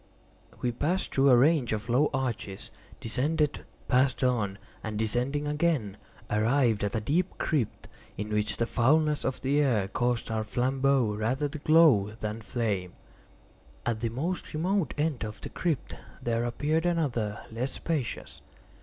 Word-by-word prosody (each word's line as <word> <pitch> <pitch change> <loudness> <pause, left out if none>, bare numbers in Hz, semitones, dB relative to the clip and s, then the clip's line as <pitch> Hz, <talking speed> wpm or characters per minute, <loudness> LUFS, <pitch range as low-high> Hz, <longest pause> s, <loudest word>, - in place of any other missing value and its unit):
We 125 - +2
passed 160 +10 -1
through 140 +1 +4
a 125 - +7
range 135 -2 +3
of 110 0 -3
low 130 +5 +3
arches, 120 -7 -3 0.3
descended, 150 +6 0 0.2
passed 130 0 +2
on, 110 -6 +1 0.3
and 110 -1 -4
descending 125 +7 0
again, 150 - 0 0.3
arrived 115 0 +2
at 100 +1 -1
a - - +2
deep 165 - 0
crypt, 140 -9 -1 0.3
in 105 +1 -4
which 105 0 0
the 115 - +1
foulness 150 +6 +2
of 130 - -2
the 140 +2 +2
air 115 -9 +2
caused 120 +3 -1
our 110 -1 0
flambeaux 130 0 +1
rather 125 +7 0
to 155 +1 -7
glow 145 -10 +5
than 110 +1 -4
flame. 105 -7 -2 0.9
At 115 -2 0
the 115 0 -1
most 155 +8 -3
remote 185 +3 0
end 150 -5 0
of 105 -1 -5
the - - -7
crypt 165 -6 -2 0.3
there 115 0 -1
appeared 155 +7 0
another 120 -12 0
less 125 +4 -2
spacious. 155 -8 -3
125 Hz, 150 wpm, -28 LUFS, 110-150 Hz, 0.9 s, a